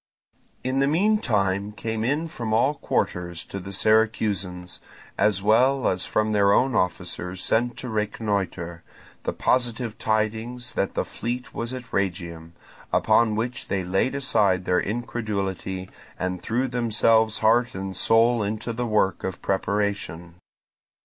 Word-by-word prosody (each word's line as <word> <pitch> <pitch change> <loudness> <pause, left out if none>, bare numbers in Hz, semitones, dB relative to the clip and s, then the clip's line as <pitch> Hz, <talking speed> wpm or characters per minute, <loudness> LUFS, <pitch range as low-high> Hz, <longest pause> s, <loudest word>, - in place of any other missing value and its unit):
In 130 +1 0
the 140 - +3
meantime 110 - +1
came 110 +1 -3
in 145 +7 0
from 115 -9 -4
all 130 +6 +3
quarters 90 - -2
to 100 - -6
the 100 +1 -8
Syracusans, 100 -4 +1 0.4
as 100 -2 +2
well 125 +5 +4
as 90 0 0
from 110 0 +1
their 100 -1 +4
own 130 +4 +3
officers 90 0 -2
sent 120 +2 +1
to 130 - -6
reconnoitre, 100 -6 -2 0.4
the - - 0
positive 120 -2 0
tidings 110 +3 -1
that 100 - -1
the - - 0
fleet 120 +2 -4
was 115 +1 -3
at 125 -2 -8
Rhegium; 85 -4 -2 0.4
upon 115 -2 +3
which 120 +3 -3
they 95 -1 -1
laid 95 +9 0
aside 105 -9 +2
their 90 - +3
incredulity 100 -4 -3 0.3
and 90 -1 -3
threw 120 +7 0
themselves 115 -2 +3
heart 120 +3 +3
and 95 0 -4
soul 115 +1 +4
into 110 +3 -2
the 120 +1 -2
work 105 -3 +1
of 95 -2 -3
preparation. 100 -4 -1
110 Hz, 135 wpm, -25 LUFS, 95-120 Hz, 0.4 s, well